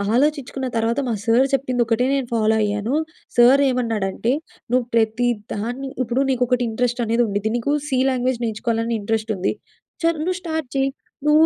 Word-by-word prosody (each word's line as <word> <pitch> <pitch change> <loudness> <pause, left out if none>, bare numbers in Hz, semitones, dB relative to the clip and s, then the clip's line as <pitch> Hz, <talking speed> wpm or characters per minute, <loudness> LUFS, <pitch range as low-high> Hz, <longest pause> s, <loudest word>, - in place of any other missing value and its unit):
ఆలోచించుకున్న 270 -1 0
తర్వాత 230 +3 +1
మా 235 - 0
సార్ 235 +4 +4
చెప్పింది, 255 -2 +1
ఒక్కటే 230 +2 +1
నేను 270 -3 0
ఫాలో 220 -1 +3
అయ్యాను. 210 +5 -1 0.4
సార్ 250 +4 +7
ఏమన్నాడంటే, 230 -3 -1 0.4
"నువ్వు 250 -1 +2
ప్రతిదాన్ని 230 +2 -1
ఇప్పుడు 250 +3 0
నీకు 250 -1 +2
ఒకటి 245 0 +1
ఇంట్రెస్ట్ 245 +2 -1
అనేది 230 +2 +2
ఉండిద్ది. 205 +1 -1
నీకు 260 +5 0 0.2
సి 260 -2 +1
లాంగ్వేజ్ 250 -1 0
నేర్చుకోవాలని 230 +1 -1
ఇంట్రెస్ట్ 220 +1 -1
ఉంది. 185 - 0 0.5
చర్ 330 -1 +2
నువ్వు 365 +2 -1
స్టార్ట్ 320 -5 -3
చెయ్యి, 270 0 +2 0.4
నువ్వు 305 +2 +6
240 Hz, 155 wpm, -21 LUFS, 225-265 Hz, 0.5 s, సార్